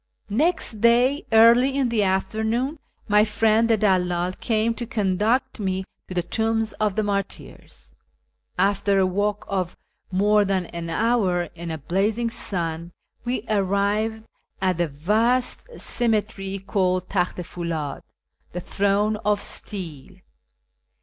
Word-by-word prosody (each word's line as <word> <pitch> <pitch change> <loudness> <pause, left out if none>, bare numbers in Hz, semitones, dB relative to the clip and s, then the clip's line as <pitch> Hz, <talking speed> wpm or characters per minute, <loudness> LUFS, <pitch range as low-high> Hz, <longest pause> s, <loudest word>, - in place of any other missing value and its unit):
Next 240 - 0
day, 245 +5 +3
early 235 +4 +6
in 265 -3 +2
the 230 -2 +1
afternoon, 220 - 0 0.3
my 210 0 +5
friend 220 +2 +2
the 225 - +4
clalldl 180 -3 +1
came 225 0 +1
to 240 0 -6
conduct 220 +3 0
me 190 -2 -1 0.2
to 185 - -7
the 175 - +1
tombs 225 +4 0
of 210 -3 +1
the 215 - +1
martyrs. 200 - -5 0.6
After 195 +1 +2
a 190 - +4
walk 205 +2 -1
of 185 -3 -2 0.3
more 205 +3 +4
than 190 -2 0
an 170 0 -6
hour 190 -5 +1
in 170 0 -7
a 160 - -3
blazing 210 - 0
sun, 170 -4 -4 0.3
we 240 -3 -1
arrived 205 +2 0 0.4
at 185 -2 +1
the 175 -1 +1
vast 220 - 0
cemetery 210 -4 -1
called 185 -2 0
Talcht 180 -2 -1
i 180 - -4
FuUid 165 -5 -4 0.5
("the 180 - -3
Throne 205 +3 +1
of 210 0 +1
Steel"). 180 -7 -5
205 Hz, 130 wpm, -24 LUFS, 185-225 Hz, 0.6 s, early